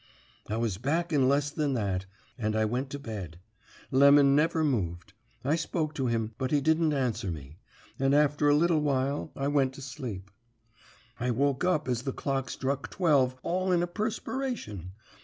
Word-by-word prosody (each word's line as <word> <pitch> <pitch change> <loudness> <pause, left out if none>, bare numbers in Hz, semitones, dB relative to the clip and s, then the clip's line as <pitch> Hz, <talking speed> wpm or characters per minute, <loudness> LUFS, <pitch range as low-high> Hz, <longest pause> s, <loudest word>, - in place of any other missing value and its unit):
"I 110 - -1
was 115 -5 -1
back 165 +7 -1
in 135 -3 +4
less 145 +1 +2
than 145 -3 -1
that, 95 -4 -1 0.3
and 110 -3 -2
I 110 0 +2
went 125 +5 -2
to 145 - -5
bed. 100 - -7 0.5
Lemon 140 +1 +6
never 160 +2 +2
moved. 100 - -1 0.3
I 145 +3 +3
spoke 155 -1 -2
to 135 -4 -1
him, 115 -1 -1
but 130 - -1
he 150 - +3
didn't 160 +2 +2
answer 120 -8 -1
me; 75 0 -8 0.4
and 135 +1 +3
after 145 0 +3
a 145 - +5
little 165 +1 +3
while 140 +1 0
I 135 - -2
went 140 -2 +2
to 140 - -10
sleep. 110 -7 -7 0.9
"I 125 +1 -1
woke 140 +4 +1
up 180 -6 +1
as 125 -2 0
the 135 0 -3
clock 135 -2 -2
struck 140 +1 -2
twelve 140 -8 +2
all 185 +2 0
in 175 -1 +3
a - - -1
prespiration. 210 - -4
135 Hz, 175 wpm, -29 LUFS, 115-150 Hz, 0.9 s, Lemon